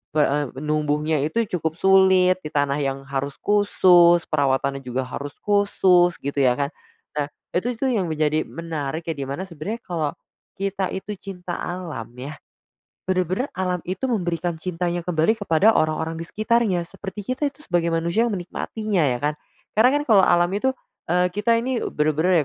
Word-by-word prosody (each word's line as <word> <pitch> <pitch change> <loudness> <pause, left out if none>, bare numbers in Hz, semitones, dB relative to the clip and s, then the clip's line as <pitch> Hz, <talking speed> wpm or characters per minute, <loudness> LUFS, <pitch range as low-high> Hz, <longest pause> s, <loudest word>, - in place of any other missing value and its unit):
pe 150 - +5
eee, 145 0 +1 0.2
numbuhnya 150 0 0
itu 195 +10 0 0.2
cukup 160 +1 -2
sulit, 190 0 +4
di - - -4
tanah 145 0 +1
yang 135 -1 -2
harus 140 +1 -3
khusus, 180 -4 +5
perawatannya 140 -1 +1
juga 130 +1 -2
harus 140 +2 -6
khusus, 190 -4 +3
gitu, 140 +1 -2
ya, 125 -1 +4
kan. 140 +1 -2 0.5
Nah, 145 - 0 0.3
itu 185 +7 +1
itu 230 - -6
yang 195 -7 0
menjadi 155 0 +1
menarik, 160 +2 -4
ya, - - 0
di 135 -1 -5
mana 140 +7 -4
sebenernya 190 +6 -6
kalau 160 -5 -2 0.4
kita 195 -1 -2
itu 205 +2 -5
cinta 180 -3 -6
alam, 165 -11 -5
ya, 140 +4 -7 0.7
bener-bener 185 - -1
alam 180 -1 -1
itu 185 +1 -4
memberikan 175 -6 -1
cintanya 175 0 -3
kembali 175 +5 +2
kepada 205 0 +3
orang-orang 160 +1 0
di 165 - -5
sekitarnya, 215 -6 +1
seperti 205 +1 -7
kita 290 - -3
itu 280 - -23
sebagai 170 -1 0
manusia 170 +7 +1
yang 225 - -3
menikmatinya, 195 +1 -2
ya, 125 -3 +1
kan. 150 +1 0 0.4
Karena, 240 +4 +6
kan, - - -1
kalau 200 -4 +6
alam 175 0 +4
itu 260 +6 +1 0.4
eee, 180 +1 +3
kita 220 +3 +2
ini 250 0 -1
bener-bener, 155 +2 +2
175 Hz, 165 wpm, -23 LUFS, 150-190 Hz, 0.7 s, Karena